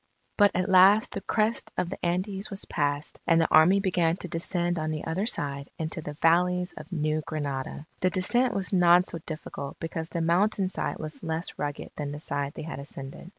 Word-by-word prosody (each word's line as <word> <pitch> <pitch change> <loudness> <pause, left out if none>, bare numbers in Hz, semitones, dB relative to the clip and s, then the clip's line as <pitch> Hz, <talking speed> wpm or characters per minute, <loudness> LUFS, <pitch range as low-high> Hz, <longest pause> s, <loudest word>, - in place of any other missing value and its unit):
But 205 -1 +6
at 185 +1 +1
last 195 +3 +6
the 200 - -4
crest 220 +2 0
of 175 - -1
the - - -7
Andes 190 +3 -1
was 195 -1 -3
passed, 145 -1 -2
and 165 -1 +5
the 165 - +3
Army 165 +6 +6
began 175 -4 +1
to 180 - -6
descend 175 +1 -1
on 155 0 -2
the 155 -1 -4
other 185 +6 -1
side 140 - -1
into 160 0 -3
the 150 -1 -7
valleys 180 +2 +3
of - - -10
New 155 -2 0
Granada. 145 -2 -4
The 185 - +2
descent 240 +8 +1
was 195 0 -2
not 175 0 +6
so 170 - -3
difficult 155 -3 -6
because 165 0 -4
the 170 - -3
mountain 185 +3 +2
side - - -3
was 155 0 -7
less 160 +1 -2
rugged 145 -1 -4
than 145 -1 -3
the 145 - -6
side 140 -1 -3
they - - -6
had 160 - -6
ascended. 140 +3 -9
170 Hz, 200 wpm, -27 LUFS, 155-185 Hz, -, But